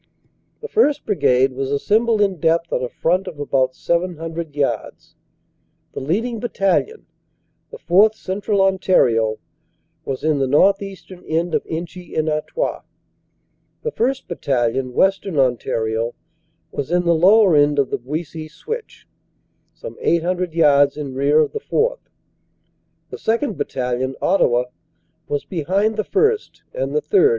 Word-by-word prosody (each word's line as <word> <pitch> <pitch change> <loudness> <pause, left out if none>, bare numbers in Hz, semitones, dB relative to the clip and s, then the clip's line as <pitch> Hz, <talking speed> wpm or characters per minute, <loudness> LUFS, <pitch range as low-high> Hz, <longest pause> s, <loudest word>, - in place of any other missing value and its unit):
"The 460 - -5
1st. 295 -11 +2
Brigade 135 - +2
was 135 +1 -3
assembled 215 +10 +1
in 195 -4 +1
depth 165 +1 +1
on - - 0
a 125 - -2
front 180 +8 0
of 165 -5 -8
about 130 -3 0
700 170 -2 -3
yards. 135 -7 -3 0.8
The - - -4
leading 220 - -1
Battalion, 235 - -1 0.6
the 475 - -10
4th. 215 - +4
Central 200 0 -1
On 190 -1 +2
tario, 115 - +2 0.7
was 135 -1 -5
in 155 -2 +1
the 135 - +1
northeastern 195 +4 0
end 165 +2 -1
of - - +1
Inchy 175 +2 -6
en 155 0 +1
Artois. 155 - -2 1.0
The 465 - -2
1st. 260 - -1
Battalion, 130 -5 -1
Western 195 -3 +1
Ontario, 115 -3 0 0.6
was 140 - -4
in 175 +1 +1
the 170 - +4
lower 190 +2 +5
end 145 0 +4
of 140 -2 +1
the - - -1
Buissy 155 +4 -6
Switch, 450 - -7 0.6
some - - -10
eight 170 -1 +2
hundred 180 -1 -2
yards 145 -3 +4
in 140 -3 -5
rear 140 +3 +3
of - - 0
the 440 - -4
4th. - - -1 1.0
The - - -6
2nd. 230 0 -1
Battalion, 130 -1 -2
Ottawa, 125 -10 +2 0.6
was 145 - -2
behind 195 +6 0
the 215 - -1
1st. 435 - 0
and - - -3
the 455 - +1
3rd. 410 0 +4
170 Hz, 140 wpm, -20 LUFS, 140-205 Hz, 1.0 s, lower